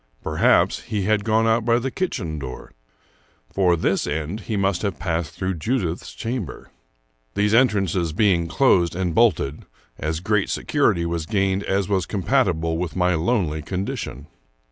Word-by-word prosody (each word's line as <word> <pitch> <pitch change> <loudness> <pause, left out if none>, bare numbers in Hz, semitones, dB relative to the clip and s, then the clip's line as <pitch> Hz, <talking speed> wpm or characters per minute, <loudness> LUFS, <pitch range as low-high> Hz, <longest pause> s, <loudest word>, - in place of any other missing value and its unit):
Perhaps - - +2
he 105 -4 -2
had 105 +1 +1
gone 110 +1 +2
out 115 0 +2
by 115 +1 +3
the 130 +2 -2
kitchen 95 - -3
door. 65 -3 -8 0.8
For 90 -3 +3
this 80 - 0
end, 80 +7 -3
he 105 +1 -3
must 95 -2 +1
have 100 -4 -2
passed 85 -4 -2
through 95 0 -2
Judith's 95 -5 -2
chamber. 115 - -5 0.6
These 105 +1 +2
entrances 100 -8 +2
being 85 -1 +2
closed 85 -7 +3
and 90 -2 -1
bolted, 85 -11 +2 0.4
as 80 +1 -2
great 100 +2 0
security 85 0 +1
was 85 -1 -3
gained 100 -2 +1
as 95 -1 0
was 95 -4 0
compatible 90 -7 0
with 90 -3 -3
my 90 0 +2
lonely 80 -3 0
condition. 80 -5 -4
95 Hz, 150 wpm, -22 LUFS, 85-110 Hz, 0.8 s, by